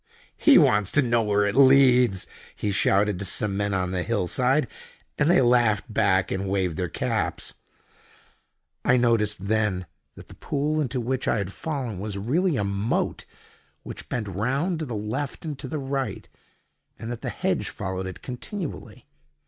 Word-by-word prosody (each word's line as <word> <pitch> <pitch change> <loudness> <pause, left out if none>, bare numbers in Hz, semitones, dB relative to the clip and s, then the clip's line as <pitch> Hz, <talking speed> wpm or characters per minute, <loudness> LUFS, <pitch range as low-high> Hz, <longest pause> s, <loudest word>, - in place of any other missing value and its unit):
"He - - +6
wants 105 -1 +4
to 145 - +5
know 120 -1 +2
where 105 -1 +2
it 105 - 0
leads!" 130 -6 +5 0.3
he 105 - -2
shouted 100 0 +2
to 100 - -3
some 100 +1 0
men 100 0 -1
on 90 -2 -1
the 90 -1 -1
hill 105 -1 -1
side, 130 - +2 0.5
and 150 +1 +3
they 175 - +5
laughed 120 -3 +2
back, 100 -3 +2
and 95 0 -2
waved 95 -4 0
their 90 +1 -2
caps. - - -2 1.3
I 125 - +4
noticed 105 -5 +2
then 105 -3 0 0.3
that - - -13
the - - -13
pool 150 +2 -1
into 130 -2 -2
which 130 +2 -2
I - - +2
had 100 -2 -3
fallen 130 - -4
was 100 0 -4
really 155 - +1
a 105 - 0
moat 100 +3 -1 0.6
which - - -9
bent 115 -4 -3
round 135 - -1
to 160 - -3
the 120 - -4
left 125 +10 -4
and 150 -2 -3
to 140 - -5
the 155 - -4
right, 135 -5 -3 0.7
and 115 +1 -6
that 120 - -6
the - - -3
hedge - - -1
followed 95 0 -4
it 95 - -9
continually. 155 +7 -7
110 Hz, 175 wpm, -25 LUFS, 100-130 Hz, 1.3 s, He